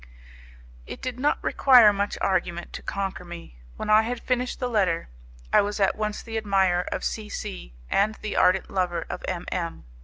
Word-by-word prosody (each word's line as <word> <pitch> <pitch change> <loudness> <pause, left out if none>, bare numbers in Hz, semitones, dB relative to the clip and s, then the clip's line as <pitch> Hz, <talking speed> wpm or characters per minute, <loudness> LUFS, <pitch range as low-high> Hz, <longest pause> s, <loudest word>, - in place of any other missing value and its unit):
It - - -7
did 250 -1 -5
not 290 +3 +2
require 245 -6 +6
much 200 0 -2
argument 175 -2 -1
to - - -6
conquer 195 -2 -4
me. 170 - -10 0.2
When - - -5
I 215 +1 +7
had 235 +2 -3
finished 250 0 -2
the 250 - -1
letter, 190 - 0 0.4
I - - +7
was 205 +1 -3
at 195 -1 +3
once 215 -1 -3
the 225 -1 -5
admirer 190 -4 +2
of - - -3
C 215 -1 -3
C - - -7
and 210 - +2
the 215 - -5
ardent 185 +1 +3
lover 175 -3 -1
of - - -6
M 180 -2 -3
M 170 - -4
200 Hz, 185 wpm, -25 LUFS, 175-220 Hz, 0.4 s, I